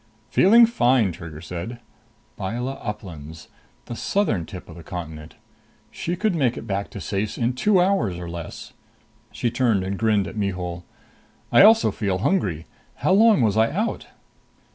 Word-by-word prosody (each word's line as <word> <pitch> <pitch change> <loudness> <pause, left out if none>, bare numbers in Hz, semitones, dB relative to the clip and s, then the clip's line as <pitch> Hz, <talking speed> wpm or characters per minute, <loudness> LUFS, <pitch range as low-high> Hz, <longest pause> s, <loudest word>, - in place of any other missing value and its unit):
"Feeling 230 +5 +7
fine," 125 - +2
Trigger 80 -2 -9
said. 90 +8 -6 0.6
Byla 120 +7 -4
Uplands 80 -7 -8 0.4
the 120 - -6
southern 115 - 0
tip 90 -3 -9
of 85 - -11
the 85 - -10
continent. 80 -2 -8 0.6
She 175 - -3
could 210 +2 0
make 135 -8 +1
it - - -7
back 100 0 -3
to - - -8
Ceyce 100 +2 -3
in 120 +1 0
two 190 +10 +3
hours 175 - +1
or 90 -1 -6
less! 85 -1 -8 0.6
She 120 - -2
turned 120 -6 +1
and 95 +1 -4
grinned 110 -3 +2
at - - -8
Mihul. 90 -4 -3 0.7
"I - - +7
also 225 +2 +6
feel 100 -4 -1
hungry. 95 - 0 0.3
How - - 0
long 210 - +5
was 105 -3 +2
I 110 +1 +3
out?" 215 +7 -2
105 Hz, 160 wpm, -23 LUFS, 90-135 Hz, 0.7 s, Feeling